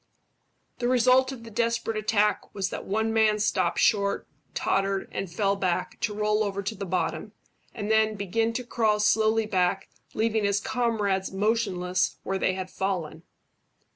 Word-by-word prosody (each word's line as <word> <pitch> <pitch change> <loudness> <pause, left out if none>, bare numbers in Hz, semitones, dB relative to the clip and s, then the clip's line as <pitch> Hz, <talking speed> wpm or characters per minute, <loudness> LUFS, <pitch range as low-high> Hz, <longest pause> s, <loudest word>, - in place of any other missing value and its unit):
The 240 - 0
result 255 +1 +4
of 250 -4 -9
the 230 - -10
desperate 230 0 -1
attack 210 -1 0
was 190 -2 -2
that - - -5
one 220 +3 0
man 220 -1 +3
stopped 210 0 0
short, 200 -2 +2 0.3
tottered, 195 0 0
and 190 -3 -4
fell 200 +2 +1
back, 185 -3 -2
to 210 - -2
roll 210 0 +1
over 200 -1 -3
to 205 - -2
the 200 -2 -6
bottom 180 +1 -2 0.4
and 205 +1 -3
then 220 0 +3
begin 215 +3 0
to 250 +2 -3
crawl 220 -3 +1
slowly 220 +1 +3
back, 190 -1 0 0.3
leaving 220 0 +1
his 200 0 +2
comrades 220 -6 -1
motionless 190 -3 0
where 195 0 -2
they 185 - +1
had 185 -1 -5
fallen. 180 -5 -3
210 Hz, 160 wpm, -26 LUFS, 195-225 Hz, 0.4 s, result